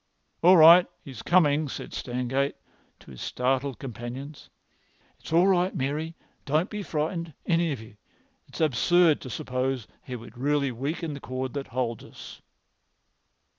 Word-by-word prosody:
"All 180 +2 +7
right, 170 +3 +9 0.2
he's 135 -8 -9
coming," 155 -4 +3
said - - -7
Stangate 125 +3 -2 0.5
to - - -14
his 65 - -10
startled 130 0 -1
companions. 130 +4 -8 0.7
"It's - - -11
all 170 +3 +5
right, 185 -1 +2
Mary. 150 +5 -2 0.3
Don't 155 +6 0
be 210 -1 -4
frightened, 165 -2 -3
any 170 -1 +2
of 135 - -4
you. 110 -1 -14 0.5
It's - - -8
absurd 160 +3 +3
to 130 - -8
suppose 130 0 -2
he 130 -3 -7
would 120 0 -11
really 140 0 +1
weaken 150 +6 -3
the 140 - -7
cord 130 0 -5
that 140 -1 -4
holds 120 -3 -3
us." - - -12
140 Hz, 145 wpm, -26 LUFS, 125-165 Hz, 0.7 s, right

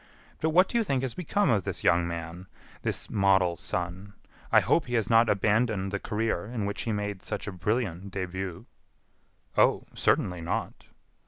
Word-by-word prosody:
But 160 - +1
what 180 +4 +5
do 235 - 0
you - - +2
think 135 -9 -1
has 130 -3 -2
become 180 -1 +1
of 105 -4 +3
this - - -5
young 85 0 +3
man, 85 +2 -6 0.3
this - - -1
model 95 -3 +3
son? 90 +4 -4 0.4
I - - +7
hope 165 - +2
he 120 - -2
has 115 -1 +1
not 115 0 +5
abandoned 105 -1 +1
the 100 - -2
career 105 -3 -2
in 115 -3 -3
which 100 - -3
he 115 - -2
made 105 -2 -3
such - - -4
a 100 - -4
brilliant 95 0 -2
début." 95 -1 -4 0.9
"Oh! - - +4
certainly 90 -2 +1
not." 85 - -3
100 Hz, 175 wpm, -28 LUFS, 90-115 Hz, 0.9 s, I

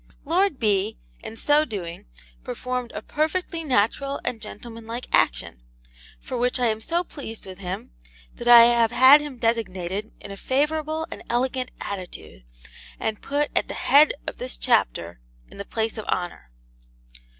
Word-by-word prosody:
Lord 345 +1 +2
B., 200 - +1 0.3
in 225 - -8
so 295 +5 +4
doing, 180 - -6 0.4
performed 250 - -4
a 210 - -6
perfectly 330 +4 -2
natural 275 +1 +1
and 225 -3 -2
gentlemanlike 230 +2 -7
action; - - +1 0.6
for 255 - -5
which 250 +1 +1
I 250 - +2
am 220 -1 0
so 340 +8 0
pleased 275 -9 -8
with 190 -1 -10
him 185 - -5 0.4
that 240 - -8
I 240 -1 +10
have 235 -1 +4
had 260 +5 +7
him 290 -4 -7
designed 210 -4 -2
in - - -9
a 200 - -7
favourable 310 +5 -1
and - - -7
elegant 255 +1 0
attitude, 180 - -7 0.5
and 220 -1 -3
put 290 +1 -1
at - - +2
the - - -5
head 295 +2 +5
of - - -4
this 255 +1 -4
Chapter 85 - 0 0.3
in - - -14
the 200 - -5
place 220 0 -2
of 215 - -6
honour. 175 - -3
235 Hz, 155 wpm, -24 LUFS, 205-280 Hz, 0.6 s, I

